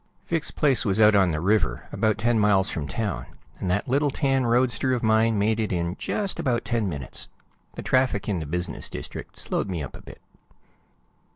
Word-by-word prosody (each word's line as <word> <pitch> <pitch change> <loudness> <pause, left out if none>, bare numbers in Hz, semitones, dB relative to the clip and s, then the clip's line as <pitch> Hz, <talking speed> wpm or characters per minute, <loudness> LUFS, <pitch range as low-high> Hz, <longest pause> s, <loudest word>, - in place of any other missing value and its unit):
Vic's 165 -2 -1
place 140 -5 +2
was 100 -3 +1
out 105 -1 +7
on 95 -3 +4
the 80 -2 -1
river, 90 - 0
about 110 -1 +1
ten 115 +2 +2
miles 105 -2 +3
from 75 -3 -4
town, 100 - -3 0.3
and 95 - -2
that 105 +4 0
little 140 +3 +2
tan 135 -2 +1
roadster 125 +1 +2
of 120 - -1
mine 110 0 +3
made 110 +2 +1
it 110 - -1
in 85 0 -1
just 200 -2 -1
about 120 -3 0
ten 115 -5 0
minutes. 70 -7 -2 0.5
The - - -6
traffic 130 -6 +1
in 100 -5 0
the 80 - -5
business 90 +3 -3
district - - -8
slowed 100 - -2
me 85 -5 -3
up 70 - -8
a - - -11
bit. - - -13
110 Hz, 195 wpm, -25 LUFS, 95-120 Hz, 0.5 s, out